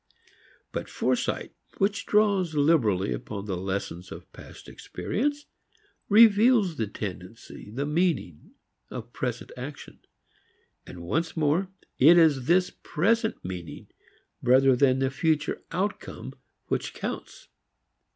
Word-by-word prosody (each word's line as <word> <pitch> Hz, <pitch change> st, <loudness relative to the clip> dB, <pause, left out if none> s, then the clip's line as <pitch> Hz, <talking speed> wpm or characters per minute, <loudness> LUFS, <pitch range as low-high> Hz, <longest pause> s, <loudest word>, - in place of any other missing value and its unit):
But -, -, -5 dB
foresight -, -, -1 dB, 0.2 s
which 200 Hz, 0 st, 0 dB
draws 200 Hz, -6 st, +2 dB
liberally 120 Hz, -, +2 dB
upon 100 Hz, -, -6 dB
the 100 Hz, -3 st, -3 dB
lessons 95 Hz, -1 st, -4 dB
of -, -, -11 dB
past -, -, -13 dB
experience 290 Hz, +5 st, -3 dB, 0.6 s
reveals 215 Hz, -, +5 dB
the 110 Hz, -, -1 dB
tendency, 100 Hz, +1 st, -8 dB
the 130 Hz, +7 st, -3 dB
meaning, 150 Hz, -, -1 dB, 0.3 s
of -, -, -8 dB
present -, -, -4 dB
action; 140 Hz, +3 st, -9 dB, 0.9 s
and, 85 Hz, -, -9 dB
once 160 Hz, -, -2 dB
more, 160 Hz, +5 st, +1 dB, 0.3 s
it 160 Hz, +6 st, +8 dB
is 145 Hz, -6 st, +4 dB
this 180 Hz, +1 st, +3 dB
present 220 Hz, -, 0 dB
meaning 90 Hz, -3 st, -7 dB, 0.5 s
rather 130 Hz, +1 st, +5 dB
than 130 Hz, 0 st, +3 dB
the 135 Hz, 0 st, 0 dB
future 155 Hz, +1 st, 0 dB
outcome 195 Hz, +5 st, -4 dB, 0.3 s
which -, -, -2 dB
counts. -, -, -6 dB
150 Hz, 110 wpm, -26 LUFS, -, 0.9 s, it